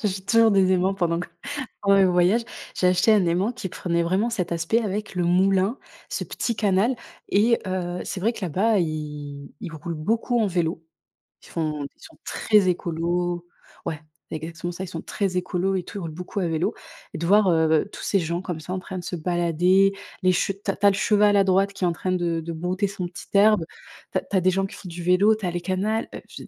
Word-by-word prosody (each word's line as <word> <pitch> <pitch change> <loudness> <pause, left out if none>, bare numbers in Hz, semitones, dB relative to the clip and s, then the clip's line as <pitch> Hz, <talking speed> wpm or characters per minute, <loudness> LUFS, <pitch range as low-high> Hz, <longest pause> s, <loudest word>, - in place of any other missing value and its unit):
j'achète 195 -2 -2
toujours 230 -1 +5
des 190 -2 +4
aimants 185 +1 +2
pendant 175 -3 0
que 180 - -6 0.5
pendant 200 0 +4
mes 195 - +6
voyages. 180 +5 +3 0.3
J'ai 180 - +2
acheté 180 +5 +4
un 205 -4 +4
aimant 185 +8 +1
qui 220 -6 -5
prenait 170 -1 -1
vraiment 190 +7 +1
cet 180 -7 -2
aspect 170 +8 +1
avec 210 0 -3
le 175 -1 0
moulin, 190 +5 +3 0.3
ce - - -2
petit 235 - -2
canal 205 +4 +2 0.4
et 230 +4 +4
heu, 180 -1 -2
c'est 185 - -4
vrai 230 +4 +1
que - - -9
là-bas, 195 +5 +2
ils 150 -3 -5
ils 165 - -6
roulent 165 +2 -5
beaucoup 225 +9 0
en 215 - +3
vélo, 170 -3 -1 0.6
ils - - -15
font 155 -3 -2
ils - - -29
sont - - -14
très 210 -4 +3
écolos 175 0 -1 0.4
ouais, 155 -1 -3 0.3
c'est 160 - -2
exactement 170 +2 -5
ça, 180 +2 -6
ils - - -10
sont 165 -1 -6
très 190 -3 -2
écolos 180 +1 0
et 185 - -1
tout, 200 - -7
ils - - -6
roulent 165 - -4
beaucoup 180 +4 -5
à 180 - 0
vélo 165 +1 0 0.4
et - - -5
de 170 - -2
voir, 205 +1 +5
heu, 160 +1 +3
tous - - -9
ces 200 - +1
gens 170 0 -2
comme 175 -4 -4
ça 180 +4 -6
en 190 - -2
train 190 0 -7
de 180 - -5
se 175 - -4
balader, 175 +3 +2 0.3
les 185 - +5
che 180 +2 +1
tu 195 - +2
as - - -6
tu 205 - 0
as - - +9
le 195 - +1
cheval 210 -1 +4
à 195 - +5
droite 195 +1 +2
qui 195 - -6
est - - +4
en - - +2
train 185 +2 -3
de 170 -2 0
de 165 +1 -5
brouter 180 +5 -1
son 190 -3 -4
petit 175 - -11
herbe. 205 -3 +5 0.5
Tu - - +2
as - - 0
tu 200 - -5
as 185 - +4
des 185 - +4
gens 195 +1 +1
qui - - -8
font 185 - -9
du 170 +1 -7
vélo, 190 +5 +4
tu 210 -3 -6
as 175 - 0
les 175 0 -3
canal, 195 +5 -1
heu - - -4
et - - -10
puis, - - -11
185 Hz, 245 wpm, -24 LUFS, 170-200 Hz, 0.6 s, as